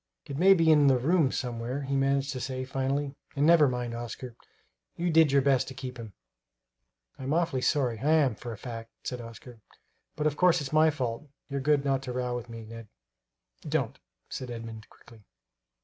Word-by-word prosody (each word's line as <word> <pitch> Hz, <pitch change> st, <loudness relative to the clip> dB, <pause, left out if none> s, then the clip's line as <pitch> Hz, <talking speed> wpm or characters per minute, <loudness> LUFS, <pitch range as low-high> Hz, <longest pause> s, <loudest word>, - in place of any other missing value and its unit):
"It 140 Hz, -, -6 dB
may 190 Hz, +6 st, +6 dB
be 165 Hz, -2 st, +4 dB
in 150 Hz, -2 st, +6 dB
the 135 Hz, -2 st, +5 dB
rooms 150 Hz, +2 st, +2 dB
somewhere," 125 Hz, +2 st, -3 dB
he 140 Hz, +1 st, -2 dB
managed 135 Hz, 0 st, +1 dB
to 130 Hz, -, -4 dB
say 130 Hz, 0 st, -4 dB
finally; 135 Hz, +2 st, -2 dB, 0.2 s
"and 145 Hz, +1 st, +2 dB
never 165 Hz, -2 st, +6 dB
mind, 125 Hz, -2 st, -3 dB
Oscar, 120 Hz, +1 st, -7 dB, 0.6 s
you 175 Hz, 0 st, -1 dB
did 160 Hz, -2 st, +5 dB
your 140 Hz, -1 st, +4 dB
best 135 Hz, -2 st, +3 dB
to 130 Hz, -, -8 dB
keep 125 Hz, -1 st, -7 dB
him." 110 Hz, -3 st, -8 dB, 1.1 s
"I'm 135 Hz, +2 st, -2 dB
awful 165 Hz, -6 st, 0 dB
sorry, 125 Hz, -5 st, +1 dB
I 145 Hz, +6 st, +1 dB
am, 145 Hz, -7 st, +4 dB
for 120 Hz, +3 st, -8 dB
a 110 Hz, -, -7 dB
fact," 115 Hz, 0 st, -7 dB
said 125 Hz, -1 st, -4 dB
Oscar; 115 Hz, +1 st, -11 dB, 0.6 s
"but 150 Hz, -, -2 dB
of 150 Hz, -1 st, +1 dB
course 180 Hz, -1 st, +4 dB
it's 145 Hz, -1 st, -5 dB
my 155 Hz, +1 st, +6 dB
fault. 135 Hz, -1 st, -4 dB, 0.2 s
You're 140 Hz, 0 st, -2 dB
good 145 Hz, 0 st, +2 dB
not 135 Hz, -1 st, +1 dB
to 130 Hz, -2 st, -5 dB
row 125 Hz, -1 st, -2 dB
me, 115 Hz, -1 st, -8 dB
Ned!" 115 Hz, 0 st, -10 dB, 0.7 s
"Don't!" -, -, -2 dB, 0.3 s
said 130 Hz, -, -6 dB
Edmund 115 Hz, -2 st, -8 dB
quickly. 115 Hz, -2 st, -18 dB
135 Hz, 190 wpm, -28 LUFS, 120-145 Hz, 1.1 s, may